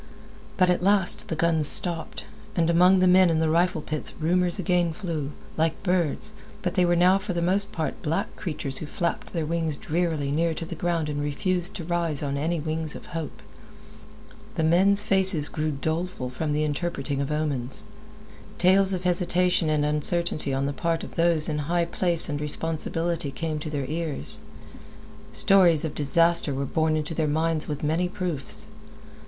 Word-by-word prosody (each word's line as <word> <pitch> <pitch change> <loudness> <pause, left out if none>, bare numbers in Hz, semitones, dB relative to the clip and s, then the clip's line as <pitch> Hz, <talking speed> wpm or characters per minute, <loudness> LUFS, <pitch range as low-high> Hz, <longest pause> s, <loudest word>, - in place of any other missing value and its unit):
But 185 -1 +3
at 180 - 0
last 195 -1 +1
the 160 - -3
guns 160 -2 +4
stopped, 170 +1 +7 0.3
and 170 -2 +1
among 180 +2 +4
the 185 - +4
men 185 0 +5
in 165 - +1
the 160 0 +1
rifle 175 -1 +1
pits 155 -1 -5
rumors 175 +2 0
again 175 -2 0
flew, 160 -6 -5 0.3
like 160 +2 -1
birds, 180 +3 -1 0.3
but - - -2
they 180 -3 +2
were 175 0 +2
now 180 +3 +4
for 195 -1 -5
the 175 - -2
most 200 +3 +1
part 160 -2 -4
black 155 +2 -3
creatures 145 -5 -4
who 155 - -7
flapped 170 +3 -4
their 165 -3 -3
wings 165 -1 -2
drearily 155 -2 -2
near 165 +2 0
to 165 - -5
the 170 - -7
ground 170 -1 -2
and 145 -1 -3
refused 175 +6 -2
to 175 - -6
rise 165 -3 -1
on 140 -1 -3
any 160 +4 -2
wings 155 0 -3
of - - -10
hope. 165 -2 -6 1.1
The 160 - -1
men's 195 +5 +3
faces 190 -7 +4
grew 155 0 -3
doleful 160 -1 -4
from 150 +3 -3
the 150 +1 0
interpreting 145 -2 -3
of 140 +1 -3
omens. 145 -5 -1 0.7
Tales 190 +1 +3
of 185 -1 -4
hesitation 180 -1 +1
and 150 -1 +1
uncertainty 150 0 +1
on 135 +1 -1
the 140 - -2
part 165 +2 -2
of - - -9
those 165 -2 +1
high 155 +3 -1
in 170 - -1
place 170 -2 +1
and 145 -2 -4
responsibility 165 +1 0
came 155 +2 -4
to 155 - -6
their 145 -3 -3
ears. 155 - -5 0.9
Stories 175 -5 +4
of 155 - -4
disaster 165 0 +2
were 140 +1 -3
borne 155 +2 0
into 155 +1 -4
their 160 -1 -1
minds 160 +1 -1
with 150 -1 -5
many 165 +4 0
proofs. 175 -8 -5
165 Hz, 180 wpm, -25 LUFS, 150-175 Hz, 1.1 s, stopped